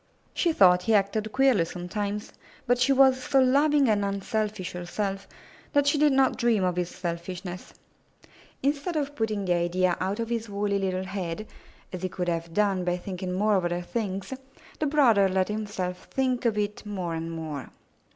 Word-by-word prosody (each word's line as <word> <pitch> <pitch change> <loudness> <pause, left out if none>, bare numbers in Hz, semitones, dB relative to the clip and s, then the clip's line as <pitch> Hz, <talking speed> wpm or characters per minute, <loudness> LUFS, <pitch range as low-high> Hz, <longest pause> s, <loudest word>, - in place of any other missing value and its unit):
She 345 - +2
thought 180 - +5
he 220 +4 +2
acted 210 +2 0
queerly 260 -7 +4
sometimes, 200 +5 -4 0.3
but 245 0 +2
she 255 +2 +3
was 265 -1 +5
so 270 - +3
loving 280 +2 +4
and 210 -2 +2
unselfish 200 0 -2
herself 195 +2 -4 0.5
that 285 0 +4
she 285 +1 +2
did 300 -1 +5
not 265 -1 +3
dream 235 -5 +2
of 180 -1 +1
his 180 -1 -1
selfishness. 180 +1 -6 0.9
Instead 290 +5 0
of 290 -2 -1
putting 215 -4 -1
the 180 - +2
idea 175 +1 +1
out 195 +3 -1
of 230 0 -2
his 230 -2 -2
woolly 200 0 -1
little 185 -1 -1
head, 190 0 -4 0.5
as 180 - -5
he 185 - -2
could 180 -1 -3
have 165 0 -3
done 195 -1 +1
by 175 0 0
thinking 185 0 -5
more 210 +4 +2
of 180 - -1
other 175 0 -1
things, 195 +2 -3 0.5
the 305 - +1
brother 235 -10 +4
let 190 +1 +1
himself 205 -4 -4
think 255 -2 0
of 225 -3 +2
it 210 0 -2
more 190 -5 -4
and 165 0 -4
more. 155 -4 -6
200 Hz, 180 wpm, -27 LUFS, 180-235 Hz, 0.9 s, thought